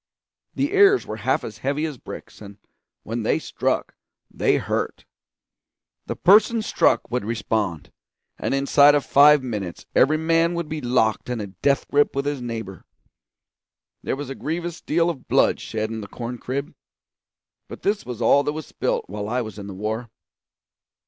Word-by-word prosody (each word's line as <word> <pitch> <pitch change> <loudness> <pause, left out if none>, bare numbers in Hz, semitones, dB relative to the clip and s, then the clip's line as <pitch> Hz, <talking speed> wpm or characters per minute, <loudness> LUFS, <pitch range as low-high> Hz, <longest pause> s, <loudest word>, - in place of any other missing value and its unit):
The 285 +6 -1
ears 400 0 +5
were - - -6
half - - 0
as 110 -1 -8
heavy 140 +5 -1
as 150 -6 -6
bricks, - - -10
and 100 -1 -11 0.5
when 115 +2 -4
they 110 - +1
struck - - -2 0.4
they - - +2
hurt. - - -3 1.0
The - - -3
persons 215 +3 +4
struck - - +2
would 125 -1 -1
respond, 105 -6 -2 0.5
and - - -1
inside 140 +1 +5
of 145 - 0
five 145 0 +6
minutes 105 -8 -5
every 155 +4 +4
man 165 +2 +2
would 170 -2 -3
be 155 0 -4
locked 120 -3 +1
in 125 -2 -2
a 105 - -3
death 100 +9 0
grip 145 -1 +2
with 140 0 -1
his 145 -2 -2
neighbour. 110 -5 -6 1.2
There - - -2
was 140 -1 -6
a - - -2
grievous 170 +4 -4
deal 165 +2 +1
of 160 -7 -4
blood - - +3
shed 110 0 -3
in 110 -1 -4
the 100 - -8
corn 120 +3 -6
crib, 140 +5 -4 0.9
but - - -10
this 205 +1 0
was 120 -2 -5
all 140 +5 +5
that 145 +1 -2
was 155 -1 -6
spilt - - -2
while 105 +2 -5
I 125 +2 0
was 110 -2 -7
in 100 - -7
the 100 - -7
war. 110 +4 -3
130 Hz, 175 wpm, -23 LUFS, 110-155 Hz, 1.2 s, five